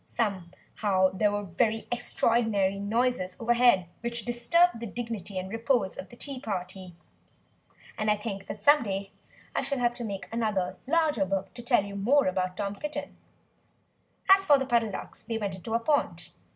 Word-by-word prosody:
Somehow 190 Hz, -1 st, -1 dB
there 205 Hz, +2 st, +2 dB
were 205 Hz, 0 st, -2 dB
very 220 Hz, +5 st, 0 dB
extraordinary 225 Hz, -5 st, +1 dB
noises 205 Hz, -3 st, 0 dB
over 235 Hz, +1 st, +2 dB
head, 240 Hz, -7 st, +4 dB
which 235 Hz, -1 st, -5 dB
disturbed 240 Hz, +6 st, +3 dB
the 235 Hz, -, -5 dB
dignity 215 Hz, -4 st, -5 dB
and 185 Hz, 0 st, -3 dB
repose 225 Hz, -3 st, 0 dB
of 185 Hz, -, -8 dB
the -, -, -12 dB
tea 275 Hz, +1 st, -6 dB
party. 185 Hz, -4 st, -5 dB, 1.0 s
And 215 Hz, 0 st, +1 dB
I 210 Hz, -, +3 dB
think 200 Hz, -2 st, -6 dB
that 210 Hz, -, -7 dB
some 290 Hz, +1 st, +6 dB
day 195 Hz, -2 st, -4 dB, 0.4 s
I -, -, +2 dB
shall 275 Hz, +1 st, -2 dB
have 240 Hz, -1 st, +1 dB
to 240 Hz, 0 st, -6 dB
make 200 Hz, -3 st, -5 dB
another, 210 Hz, -6 st, -1 dB
larger, 305 Hz, -7 st, +2 dB
book, 190 Hz, 0 st, -2 dB
to 240 Hz, -, -8 dB
tell 240 Hz, -4 st, +3 dB
you 200 Hz, 0 st, -7 dB
more 255 Hz, +9 st, +3 dB
about 185 Hz, 0 st, -1 dB
Tom 200 Hz, 0 st, -3 dB
Kitten! 300 Hz, +5 st, -5 dB, 1.1 s
As 390 Hz, 0 st, +7 dB
for 295 Hz, -6 st, +6 dB
the 265 Hz, -, -2 dB
Puddle 235 Hz, -3 st, +2 dB
Ducks 195 Hz, -, -7 dB
they 225 Hz, 0 st, -3 dB
went 200 Hz, -3 st, -3 dB
into 205 Hz, +5 st, -4 dB
a -, -, +3 dB
pond. 290 Hz, +5 st, 0 dB
220 Hz, 180 wpm, -28 LUFS, 195-240 Hz, 1.1 s, As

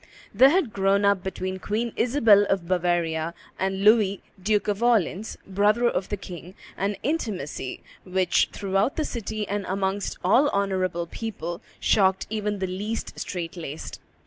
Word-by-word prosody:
There 255 Hz, +7 st, +7 dB
had 300 Hz, -, +1 dB
grown 200 Hz, +1 st, +2 dB
up 200 Hz, -2 st, +3 dB
between 185 Hz, 0 st, -4 dB
Queen 220 Hz, +4 st, -2 dB
Isabel 230 Hz, -5 st, +5 dB
of 190 Hz, -3 st, 0 dB
Bavaria 170 Hz, -2 st, 0 dB, 0.2 s
and 190 Hz, +1 st, -1 dB
Louis, 210 Hz, -2 st, +4 dB, 0.2 s
Duke 210 Hz, +2 st, +1 dB
of 205 Hz, +1 st, -1 dB
Orleans, 220 Hz, -3 st, +1 dB
brother 210 Hz, +5 st, +2 dB
of 195 Hz, -, -1 dB
the 205 Hz, -, -2 dB
king, 180 Hz, -1 st, -9 dB, 0.2 s
an 200 Hz, +2 st, -1 dB
intimacy 210 Hz, -, -3 dB, 0.2 s
which, 185 Hz, 0 st, +2 dB
throughout 195 Hz, +5 st, 0 dB
the 310 Hz, -, -1 dB
city 215 Hz, -4 st, -4 dB
and 205 Hz, 0 st, -2 dB
amongst 195 Hz, +1 st, -2 dB
all 250 Hz, +11 st, +4 dB
honorable 185 Hz, -3 st, 0 dB
people, 175 Hz, -3 st, -5 dB, 0.2 s
shocked 190 Hz, -2 st, +3 dB
even 210 Hz, -1 st, -1 dB
the 190 Hz, -, -1 dB
least 205 Hz, +5 st, -4 dB
strait 175 Hz, -2 st, -4 dB
laced. 160 Hz, -3 st, -7 dB
195 Hz, 145 wpm, -25 LUFS, 185-215 Hz, 0.2 s, There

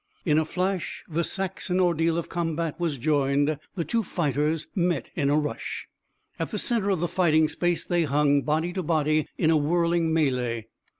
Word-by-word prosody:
In 155 Hz, -1 st, +4 dB
a 160 Hz, -, 0 dB
flash 185 Hz, +2 st, -2 dB
the 170 Hz, +1 st, -1 dB
Saxon 190 Hz, 0 st, -2 dB
ordeal 165 Hz, -2 st, +2 dB
of 170 Hz, -, -3 dB
combat 165 Hz, -2 st, -2 dB
was 165 Hz, -5 st, -1 dB
joined. 145 Hz, +1 st, +1 dB, 0.2 s
The 170 Hz, -, -2 dB
two 230 Hz, -1 st, +1 dB
fighters 150 Hz, -, -1 dB
met 175 Hz, -, 0 dB
in 140 Hz, -1 st, 0 dB
a 145 Hz, -, +3 dB
rush. 150 Hz, -1 st, -3 dB, 0.5 s
At -, -, -2 dB
the -, -, -3 dB
center 225 Hz, -5 st, +1 dB
of 190 Hz, -5 st, +1 dB
the 175 Hz, -, +1 dB
fighting 160 Hz, -3 st, +3 dB
space 175 Hz, +2 st, 0 dB
they 175 Hz, -2 st, +1 dB
hung, 145 Hz, 0 st, +3 dB
body 160 Hz, +4 st, 0 dB
to 185 Hz, -, -2 dB
body, 155 Hz, -2 st, +1 dB
in 160 Hz, -, +3 dB
a 160 Hz, -, +4 dB
whirling 170 Hz, +2 st, +1 dB
melée. 125 Hz, -7 st, 0 dB
160 Hz, 180 wpm, -26 LUFS, 150-175 Hz, 0.5 s, In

